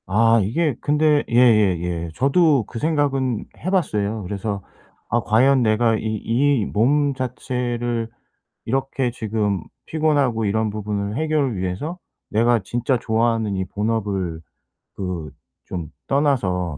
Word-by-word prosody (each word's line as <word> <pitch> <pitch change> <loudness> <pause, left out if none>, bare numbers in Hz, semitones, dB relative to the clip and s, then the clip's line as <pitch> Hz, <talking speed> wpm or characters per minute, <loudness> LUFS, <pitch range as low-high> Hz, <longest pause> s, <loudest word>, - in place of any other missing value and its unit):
아 115 +4 +4
이게 140 - 0
근데 150 0 +3
예예예. 95 -8 +3
저도 140 0 +3
그 115 - -7
생각은 135 -6 0
해 185 - -3
봤어요. 110 - 0
그래서 100 +2 -3 0.5
'아 120 - +2
과연 130 +5 +4
내가 115 0 +3
이 - - -5
이 115 +3 +1
몸 140 +6 +2
자체를 120 -2 -3 0.6
이렇게 135 0 -1
지금 105 -6 -1 0.2
피곤하고 145 -8 +1
이런 110 +2 +1
부분을 105 0 -3
해결을 150 -7 0
위해서 95 - -3 0.3
내가 115 +2 +3
진짜 120 +5 0
좋아하는 110 -2 0
이 95 0 -1
본업을 100 -5 -2 0.5
그 90 -6 -4 0.3
좀 85 -5 -5 0.2
떠나서 95 - +1
115 Hz, 245 characters per minute, -22 LUFS, 100-135 Hz, 0.6 s, 아